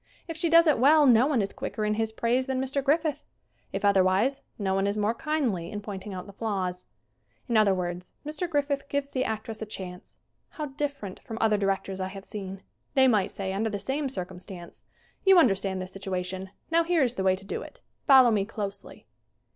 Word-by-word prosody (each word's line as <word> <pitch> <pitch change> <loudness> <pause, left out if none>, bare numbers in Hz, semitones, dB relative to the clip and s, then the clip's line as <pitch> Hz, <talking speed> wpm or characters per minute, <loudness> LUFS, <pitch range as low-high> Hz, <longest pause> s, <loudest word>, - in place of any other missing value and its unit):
If 330 - -5
she 325 +2 0
does 335 +1 +7
it 305 -6 +3
well 295 +4 +6
no 245 0 +6
one 265 -8 +2
is 195 - -4
quicker 215 - -3
in 210 - +1
his 220 0 -1
praise 240 +4 0
than 265 -1 -1
Mr. 270 +1 -1
Griffith. 300 0 +1 0.5
If - - -2
otherwise, 200 +7 +3 0.2
no 195 -2 -1
one 195 +1 +1
is 200 +1 -1
more 210 +2 +1
kindly 235 - -1
in 205 - -5
pointing 205 -1 -7
out 185 -1 -6
the 200 - -12
flaws. 185 -4 -3 0.6
In 235 - -1
other 210 -3 +5
words, 180 0 -4
Mr. 310 +4 -3
Griffith 285 -2 -1
gives 285 0 -2
the 255 - 0
actress 220 -1 -4
a - - -2
chance. 180 -3 -8 0.3
How 305 - -5
different 280 -8 -4
from 225 - -8
other 220 -1 +3
directors 195 -1 -1
I 185 - -1
have 195 +1 -9
seen. 195 -2 -7 0.3
They 265 -1 +6
might 210 -5 +3
say 190 -1 -4
under 220 +3 0
the 205 - -3
same 270 +7 -2
circumstances: 185 -4 -8 0.4
"You 385 -1 +7
understand 195 - +3
this 185 0 -6
situation. 190 0 -4 0.2
Now 335 +1 +4
here 335 -3 +2
is 245 -2 +1
the 190 - -3
way 190 0 +4
to 195 +1 -13
do - - -4
it. - - -12 0.3
Follow 260 -4 +8
me 205 -3 +2
closelly." 200 - -7
215 Hz, 205 wpm, -27 LUFS, 195-275 Hz, 0.6 s, Follow